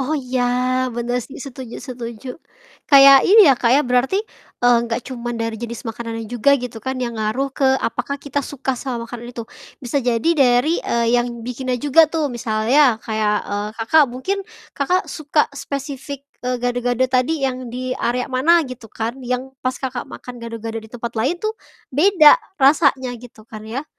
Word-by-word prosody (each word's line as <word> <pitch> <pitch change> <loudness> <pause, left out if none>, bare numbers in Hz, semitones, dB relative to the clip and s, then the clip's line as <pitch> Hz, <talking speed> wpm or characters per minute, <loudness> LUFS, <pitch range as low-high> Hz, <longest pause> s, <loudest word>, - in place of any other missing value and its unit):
Oh 275 +4 -1
iya, 255 -2 -2 0.5
bener 240 +1 -1
sih 265 - -10
setuju 260 -3 -8
setuju. 240 -1 -8 0.6
Kayak 275 -2 +9
ini 425 +1 +8
ya - - +7
Kak, 235 - +2
ya - - +4
berarti, 250 +8 +1 0.5
eee, 245 0 +6
gak 230 +1 -1
cuman 240 -2 -5
dari 230 -1 -3
jenis 235 +1 -6
makanannya 225 0 -5
juga 245 +5 +2
gitu 240 -3 -7
kan 260 +3 -4
yang 245 -2 -3
ngaruh 220 +6 -1
ke 275 - -1
apakah 255 +2 -3
kita 285 0 -3
suka 275 -1 -3
sama 245 -2 -4
makanan 240 0 -8
itu. 230 - -4 0.4
Bisa 275 +4 0
jadi 245 +3 0
dari, 275 +2 +3
eee, 235 0 0
yang 240 -1 -5
bikinnya 250 +1 -3
juga 295 +4 +4
tuh 310 -4 -2
misalnya 240 +3 +2
kayak, 215 -2 0 0.2
eee, 205 +1 -2 0.2
Kakak, 315 +5 +5
mungkin 260 +11 -3 0.4
Kakak 360 +7 0
suka 300 -1 +1
spesifik, 280 0 -6 0.2
eee, 250 0 -2
gado-gado 245 0 0
tadi 260 +3 0
yang 255 -1 -3
di 255 +2 -4
area 250 0 -1
mana, 325 +6 +4
gitu 250 -4 -10
kan 225 +2 -3
yang 255 +1 -3
pas 255 0 -2
Kakak, 255 -2 -5
makan 245 -1 -10
gado-gado 230 -1 -6
di 220 - -14
tempat 235 0 -6
lain 275 +10 0
tuh 430 +5 -2 0.4
beda 310 +1 +6 0.2
rasanya 270 -3 +3
gitu 230 -3 -14
kan 215 -1 -10
ya? 265 +7 -4
250 Hz, 175 wpm, -20 LUFS, 235-275 Hz, 0.6 s, Kayak